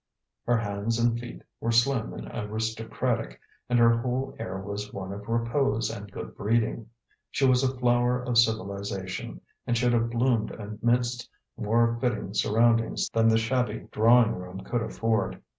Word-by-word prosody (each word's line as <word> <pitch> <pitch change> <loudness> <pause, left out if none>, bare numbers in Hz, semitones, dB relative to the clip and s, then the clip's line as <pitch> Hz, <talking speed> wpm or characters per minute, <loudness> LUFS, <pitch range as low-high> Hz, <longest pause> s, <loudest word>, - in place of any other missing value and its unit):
Her 120 0 +4
hands 105 +1 -2
and 120 0 +2
feet 120 0 -9 0.2
were 115 - -1
slim 115 0 +2
and - - -7
aristocratic, 110 - -2 0.3
and 120 - +3
her 115 0 +5
whole 130 +3 -2
air 95 +1 -4
was 100 +1 -5
one 95 0 -6
of 105 +2 -9
repose 115 +1 +1
and 105 -2 -8
good - - -8
breeding. 115 +1 0 0.4
She 135 - +1
was 130 0 +4
a 130 0 0
flower 120 0 +2
of 125 -2 +2
civilization, 100 - -2 0.3
and 120 - +1
should 120 +1 +2
have 115 0 +2
bloomed 120 -1 +1
amidst 120 +3 -1 0.3
more 115 +1 +1
fitting 110 -6 -1
surroundings 115 +2 +2
than 115 0 +3
the 110 0 +5
shabby 125 +2 -1
drawing 115 +1 +5
room 90 +1 -7
could 120 +5 -2
afford. 110 -2 -1
115 Hz, 155 wpm, -27 LUFS, 105-120 Hz, 0.4 s, her